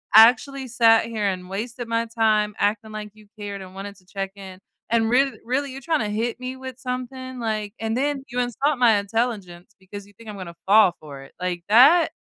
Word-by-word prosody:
actually 255 +4 +6
sat 225 -2 +4
here 220 -3 -3
and 185 -1 -3
wasted 230 +4 -5
my 230 0 0
time 215 -2 +2
acting 215 +1 -1
like 210 -1 -7
you 215 -1 -19
cared 200 -1 -6
and 185 0 -11
wanted 200 +1 -7
to 185 - -24
check-in. 195 -1 -7 0.3
And 225 0 +2
real 270 +2 +3
really, 265 +4 -1
you're 270 +1 -8
trying 315 +2 0
to 210 - -2
hit 230 +3 -2
me 255 +1 -5
with 260 -1 -9
something," 255 0 -5
like 215 -2 -3
and 225 0 -2
then 275 +1 -1
you 245 - -3
insult 250 +3 0
my 230 -4 +5
intelligence 200 -4 -3
because 200 +1 -10
you 205 - -20
think 220 +2 -13
I'm 205 - -7
gonna 170 -3 -8
fall 195 -3 +5
for 140 -3 -10
it, - - -16
like, 180 -1 -3
that 275 +10 +6
225 Hz, 205 wpm, -23 LUFS, 200-250 Hz, 0.3 s, actually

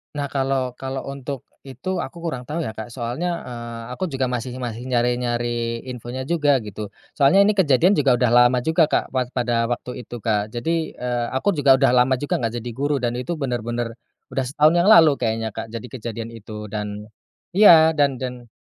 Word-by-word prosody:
Nah, 145 -1 -3
kalau 135 -2 0
kalau 135 0 -4
untuk 140 -1 -6 0.2
itu 185 +7 -4
aku 170 -1 -6
kurang 130 -7 -4
tau 165 +3 -2
ya 110 - -4
Kak. 110 +1 -7
Soalnya, 130 +9 -3
eee, 120 -1 -7
aku 185 +9 -3
juga 135 -4 -2
masih 125 0 -3
masih 125 -1 -5
nyari-nyari 120 -1 -1
infonya 125 +2 -6
juga, 145 -4 +2
gitu. 105 0 -6 0.2
Soalnya 150 +8 +5
ini 205 - +4
kejadian 180 -3 +3
juga 140 -9 +3
udah 120 -1 +1
lama 125 +1 +5
juga 160 +1 +3
Kak, - - -1
wak 130 -1 -2
pada 120 -2 +1
waktu 125 +1 -5
itu - - -7
Kak. 105 -2 +1
Jadi, 160 +9 -2
eee, 120 -1 -2
aku 205 +10 +2
juga 140 -6 +5
udah 135 -1 +3
lama 125 +1 +4
juga 145 +2 -2
nggak 115 -2 -2
jadi 120 - -5
guru, 145 +4 -1
dan 120 0 -1
itu 135 +7 -3
benar-benar, 120 -4 -3 0.4
udah 135 -1 -1
setahun 150 +4 +3
yang 175 - +3
lalu 165 -8 +8
kayaknya 110 -1 -1
Kak, 115 - -6
jadi 115 +2 -7
kejadian 115 -2 -6
itu. 105 -2 -9
Dan 105 -1 -4 0.5
iya, 170 -5 +7
dan 145 -3 +2
dan, 125 -1 -6
125 Hz, 190 wpm, -22 LUFS, 120-145 Hz, 0.5 s, lalu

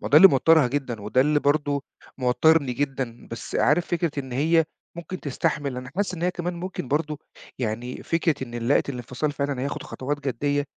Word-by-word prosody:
ما - - -4
ده 145 - +5
اللي 195 +5 +11
موترها 155 0 +5
جدًا، 130 -5 -3
وده 105 +5 +2
اللي 150 +2 +3
برضه 145 -1 +1 0.4
موترني 130 +2 +3
جدًا 130 -3 -3
بس 115 - -7
عارف 155 +5 +3
فكرة 170 -2 0
إن 130 -2 -8
هي 160 +5 +3 0.3
ممكن 175 +2 -6
تستحمل، 145 -1 -1
أنا 125 0 -6
حاسس 195 -2 0
إن 170 - -7
هي 180 - +2
كمان 175 0 -4
ممكن 175 -6 -5
برضه 150 +1 -1 0.4
يعني 120 +1 -3
فكرة 165 -4 0
إن 120 - -11
لقت 145 - +3
الانفصال 125 +3 -3
فعلًا 140 -2 -2
هياخد 140 - -3
خطوات 145 +1 -4
جدّيّة، 145 +4 0
145 Hz, 185 wpm, -25 LUFS, 130-160 Hz, 0.4 s, اللي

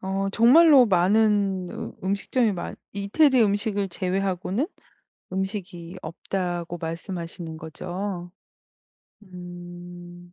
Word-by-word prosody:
어 195 +1 -1
정말로 265 +4 +7
많은 195 0 +3
으 - - -6
음식점이 205 +3 +1
많 175 - -5 0.2
이태리 240 +6 +3
음식을 205 -1 0
제외하고는 190 - -1 0.7
음식이 190 -2 -4
없다고 175 -1 -3
말씀하시는 165 0 -5
거죠? 175 +3 -5 1.0
음. 175 -1 -10
190 Hz, 215 characters per minute, -25 LUFS, 175-205 Hz, 1.0 s, 정말로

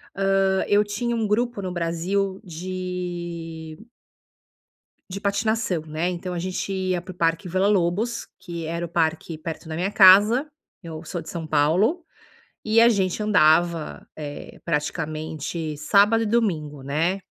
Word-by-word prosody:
Hã, 195 -1 +2
eu 205 +1 +4
tinha 230 +3 -2
um 220 -2 0
grupo 235 +1 0
no 185 -2 -4
Brasil 180 +3 -1
de 175 -2 -5 1.3
de 195 - -4
patinação, 200 -3 0
né, 155 +3 -2
então 180 0 -4
a - - -2
gente 185 +2 -3
ia 185 -2 -1
pro 185 0 -10
Parque 165 +2 0
Villa-Lobos, 195 +4 +1
que 170 -4 -6
era 170 +1 -3
o - - -6
parque 160 -1 -1
perto 160 0 -6
da 160 - -5
minha 185 +5 -1
casa. 210 +8 +7 0.4
Eu 160 -1 -7
sou 170 +2 -5
de - - -9
São 165 -2 -5
Paulo. 175 - +2 0.6
E 220 +1 +4
a 235 - +7
gente 195 -3 +1
andava, 170 -5 +2
eh, 145 -2 -8
praticamente 155 0 -3
sábado 205 +8 +4
e 225 - -1
domingo, 160 - 0
né. 165 +7 0
180 Hz, 140 wpm, -24 LUFS, 165-200 Hz, 1.3 s, casa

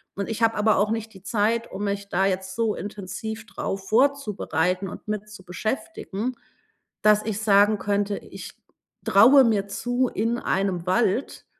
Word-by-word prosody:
Und 200 - -3
ich 225 +1 -2
habe 225 0 +3
aber 210 0 +3
auch 210 +1 +2
nicht 225 0 -3
die 190 -1 -15
Zeit, 225 +3 0
um 205 +2 -4
mich 200 0 -3
da 190 +2 +1
jetzt 190 0 -2
so 225 -2 0
intensiv 210 +2 -6
drauf 195 0 -5
vorzubereiten 210 - +1
und - - -10
mit 215 0 -4
zu 205 -3 -12
beschäftigen, 230 - -4 0.7
dass 210 0 +5
ich 215 -2 -2
sagen 205 0 +4
könnte: 205 0 -1
„Ich - - -10 0.5
traue 255 +7 +7
mir 205 -3 +1
zu, 245 +5 -1
in 230 +3 -1
einem 190 -3 -1
Wald, 230 +5 0
210 Hz, 160 wpm, -24 LUFS, 195-225 Hz, 0.7 s, traue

